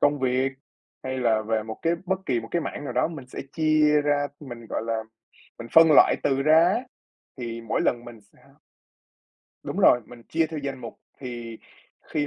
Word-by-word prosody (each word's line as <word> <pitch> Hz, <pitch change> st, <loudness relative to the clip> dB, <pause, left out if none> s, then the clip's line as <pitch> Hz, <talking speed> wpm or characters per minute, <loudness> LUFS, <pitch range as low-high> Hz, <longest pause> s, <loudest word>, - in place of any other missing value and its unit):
công 145 Hz, 0 st, +3 dB
việc, 130 Hz, +1 st, 0 dB, 0.5 s
hay 130 Hz, 0 st, -4 dB
là 115 Hz, -3 st, +2 dB
về 110 Hz, 0 st, -1 dB
một 110 Hz, 0 st, -8 dB
cái 165 Hz, -, +2 dB
bất 190 Hz, +1 st, -1 dB
kỳ 120 Hz, -3 st, +1 dB
một 115 Hz, -, -10 dB
cái 170 Hz, -2 st, 0 dB
mảng 145 Hz, -, -6 dB
nào -, -, -4 dB
đó -, -, +1 dB
mình 150 Hz, -7 st, -9 dB
sẽ -, -, -7 dB
chia 155 Hz, -1 st, +3 dB
ra, 145 Hz, -1 st, +1 dB
mình, 120 Hz, -5 st, -9 dB
gọi -, -, -3 dB
là, 115 Hz, -1 st, -1 dB, 0.6 s
mình 115 Hz, -, -8 dB
phân 165 Hz, 0 st, +8 dB
loại -, -, +6 dB
từ 135 Hz, 0 st, +1 dB
ra 155 Hz, +2 st, +6 dB
á, 200 Hz, +6 st, +1 dB, 0.6 s
thì 115 Hz, -2 st, -5 dB
mỗi 115 Hz, -, -2 dB
lần 120 Hz, -1 st, 0 dB
mình 120 Hz, -2 st, -11 dB
sẽ 100 Hz, -, -28 dB, 1.2 s
Đúng -, -, -6 dB
rồi, 125 Hz, -, +6 dB
mình 120 Hz, -1 st, -13 dB
chia 160 Hz, 0 st, +1 dB
theo 160 Hz, 0 st, -6 dB
danh 140 Hz, -2 st, -5 dB
mục 115 Hz, -2 st, -9 dB, 0.2 s
thì 120 Hz, -3 st, -7 dB, 0.4 s
khi 150 Hz, -2 st, -2 dB
130 Hz, 200 wpm, -25 LUFS, 115-150 Hz, 1.2 s, phân